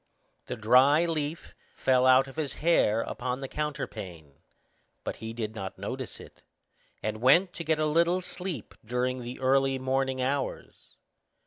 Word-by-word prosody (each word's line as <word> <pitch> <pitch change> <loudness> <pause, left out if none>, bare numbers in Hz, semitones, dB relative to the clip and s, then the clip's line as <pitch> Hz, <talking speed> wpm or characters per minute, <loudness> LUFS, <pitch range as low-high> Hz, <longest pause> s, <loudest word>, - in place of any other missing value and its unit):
The - - -3
dry 130 +8 +5
leaf 155 -1 -3 0.2
fell 130 -1 +3
out 130 +1 +6
of 135 - -11
his 150 -3 -2
hair 130 -9 +3
upon 125 +2 -3
the 135 - -5
counterpane; 95 - -5 0.6
but - - -4
he 110 0 -6
did 110 -2 -4
not 95 -4 -6
notice - - -5
it, - - -14 0.6
and 110 0 -3
went 175 +9 +5
to 170 - -5
get 160 0 +1
a 155 - +1
little 170 +4 +3
sleep 185 -1 -6
during 125 +2 -1
the 120 +1 -7
early 135 0 +2
morning 130 0 -1
hours. 135 +2 -3
130 Hz, 150 wpm, -28 LUFS, 120-150 Hz, 0.6 s, out